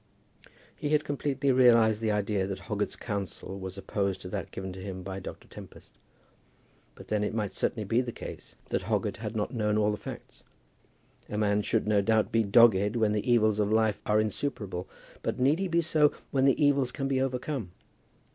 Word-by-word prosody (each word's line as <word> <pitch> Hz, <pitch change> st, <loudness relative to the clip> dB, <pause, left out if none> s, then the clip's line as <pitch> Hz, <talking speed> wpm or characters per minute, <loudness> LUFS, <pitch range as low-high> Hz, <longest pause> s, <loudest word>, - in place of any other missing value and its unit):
He 145 Hz, -, -3 dB
had 150 Hz, 0 st, +3 dB
completely 140 Hz, -1 st, 0 dB
realized 115 Hz, -4 st, +5 dB
the 110 Hz, -, 0 dB
idea 105 Hz, -2 st, 0 dB
that 95 Hz, -, -5 dB
Hoggett's -, -, -2 dB
counsel 100 Hz, -1 st, -5 dB
was 95 Hz, 0 st, -6 dB
opposed 100 Hz, -1 st, -2 dB
to 90 Hz, -, -7 dB
that 100 Hz, -2 st, -4 dB
given 95 Hz, -1 st, -6 dB
to 95 Hz, -, -9 dB
him 95 Hz, -1 st, -6 dB
by 95 Hz, +1 st, -5 dB
Dr. 95 Hz, -, -9 dB
Tempest; -, -, -13 dB, 1.0 s
but -, -, -13 dB
then 105 Hz, -1 st, +1 dB
it 105 Hz, -, -2 dB
might 105 Hz, -3 st, -1 dB
certainly 110 Hz, -, -2 dB
be 115 Hz, +5 st, +2 dB
the 125 Hz, -2 st, -4 dB
case -, -, -9 dB
that -, -, 0 dB
Hoggett -, -, -1 dB
had -, -, -5 dB
not -, -, -2 dB
known 105 Hz, -2 st, +1 dB
all 105 Hz, 0 st, +3 dB
the 105 Hz, -, -3 dB
facts. -, -, -10 dB, 0.9 s
A 105 Hz, -, -3 dB
man 105 Hz, -1 st, +2 dB
should, 110 Hz, +1 st, 0 dB
no 105 Hz, -1 st, +3 dB
doubt, 110 Hz, +1 st, +2 dB
be 115 Hz, -, +3 dB
dogged 105 Hz, -1 st, +5 dB
when 110 Hz, -3 st, +2 dB
the 105 Hz, +3 st, 0 dB
evils 110 Hz, -3 st, +3 dB
of 105 Hz, 0 st, +1 dB
life 110 Hz, -1 st, +2 dB
are 105 Hz, 0 st, +3 dB
insuperable; 105 Hz, -4 st, -3 dB, 0.3 s
but -, -, -2 dB
need 140 Hz, +6 st, +3 dB
he 195 Hz, -, 0 dB
be 170 Hz, -1 st, +2 dB
so 155 Hz, -2 st, +3 dB, 0.2 s
when 135 Hz, -1 st, +2 dB
the 135 Hz, +1 st, +3 dB
evils 140 Hz, -4 st, +3 dB
can 135 Hz, +1 st, -3 dB
be 135 Hz, -1 st, +1 dB
overcome? 130 Hz, -4 st, -2 dB
110 Hz, 195 wpm, -29 LUFS, 100-130 Hz, 1.0 s, realized